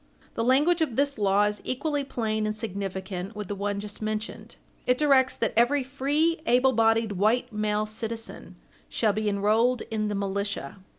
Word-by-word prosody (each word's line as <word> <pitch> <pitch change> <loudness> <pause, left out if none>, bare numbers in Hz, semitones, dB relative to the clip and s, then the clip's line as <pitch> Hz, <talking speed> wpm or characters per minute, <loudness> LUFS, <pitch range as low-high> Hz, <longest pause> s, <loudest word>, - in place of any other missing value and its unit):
The 230 - -1
language 295 +8 +3
of 280 -8 0
this 280 -2 +1
law 200 0 +3
is 210 0 -1
equally 285 +2 -1
plain 220 -5 -2
and 215 - -2
significant 195 -2 -4
with 210 -2 -6
the - - -1
one 200 0 -2
just 205 +1 -6
mentioned. 215 0 -4 0.3
It 250 0 +3
directs 270 -3 +4
that 230 - -1
every 260 +5 +3
"free 290 +5 0
able 250 +2 +4
bodied 225 -1 +3
white 220 +5 +1
male 210 0 0
citizen" 225 +1 -5 0.3
shall 215 -3 +1
be 215 0 0
enrolled 220 +5 +2
in 215 -1 -1
the 205 - -2
militia. 200 -4 -3
220 Hz, 170 wpm, -26 LUFS, 205-255 Hz, 0.3 s, directs